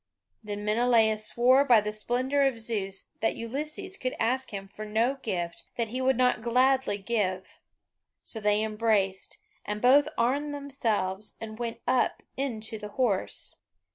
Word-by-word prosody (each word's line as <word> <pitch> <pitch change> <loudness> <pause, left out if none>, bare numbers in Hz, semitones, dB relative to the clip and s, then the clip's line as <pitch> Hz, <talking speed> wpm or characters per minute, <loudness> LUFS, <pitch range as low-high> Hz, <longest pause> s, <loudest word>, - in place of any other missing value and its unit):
Then 205 -1 -5
Menelaus 220 -1 +3
swore 255 +3 +4
by 245 -5 +6
the 210 0 -3
splendour 255 +6 0
of 270 -4 +2
Zeus 205 -4 -1
that 225 - 0
Ulysses 300 +10 -3
could 255 0 -3
ask 260 +3 +1
him 195 -3 -6
for 210 +2 -9
no 225 +6 0
gift 175 -7 -3
that 230 -2 -1
he 255 +3 -3
would 260 -1 +2
not 250 -3 +2
gladly 255 -1 +2
give; 195 -3 -2 0.6
so 225 - -4
they 210 0 +2
embraced, 215 -3 0 0.3
and 210 0 -3
both 275 +5 +5
armed 285 +5 0
themselves 215 -8 -2
and 220 0 -8
went 235 -1 -4
up 255 - +1
into 225 -5 -3
the 210 0 -7
horse. 230 -8 -1
230 Hz, 150 wpm, -28 LUFS, 210-255 Hz, 0.6 s, by